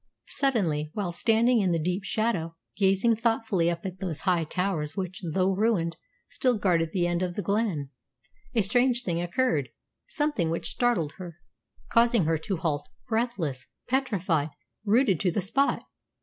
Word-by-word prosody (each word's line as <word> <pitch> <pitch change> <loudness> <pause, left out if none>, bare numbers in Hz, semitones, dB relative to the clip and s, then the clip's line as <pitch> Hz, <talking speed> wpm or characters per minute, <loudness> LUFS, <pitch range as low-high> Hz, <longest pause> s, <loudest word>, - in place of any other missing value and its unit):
Suddenly, 180 - 0
while 195 -4 -2
standing 230 +5 +3
in 185 -3 +2
the - - +2
deep 180 +4 -1
shadow, 195 -7 -1 0.2
gazing 195 +4 +3
thoughtfully 225 -6 +1
up 170 +1 -4
at 185 -1 -5
those 175 -5 -3
high 180 -3 +2
towers 180 -2 -2
which, 185 -1 -4
though 190 +1 +2
ruined, 190 -5 +1 0.3
still 250 -3 +1
guarded 170 -5 +2
the 180 -2 +1
end 175 0 0
of 180 -1 -2
the 205 - -3
glen, 195 -8 -1 0.6
a 225 - +4
strange 245 +4 +2
thing 170 -2 -1
occurred 175 - 0 0.4
something 295 - 0
which 165 - -1
startled 215 -12 +1
her, 175 -3 -8 0.5
causing 230 -5 +4
her 160 0 +1
to 195 +3 -3
halt 150 -3 -2 0.2
breathless, 205 - -2 0.2
petrified, 190 - 0 0.4
rooted 210 - +3
to 185 - +2
the 175 - -1
spot. 250 +9 +1
190 Hz, 155 wpm, -27 LUFS, 165-230 Hz, 0.6 s, a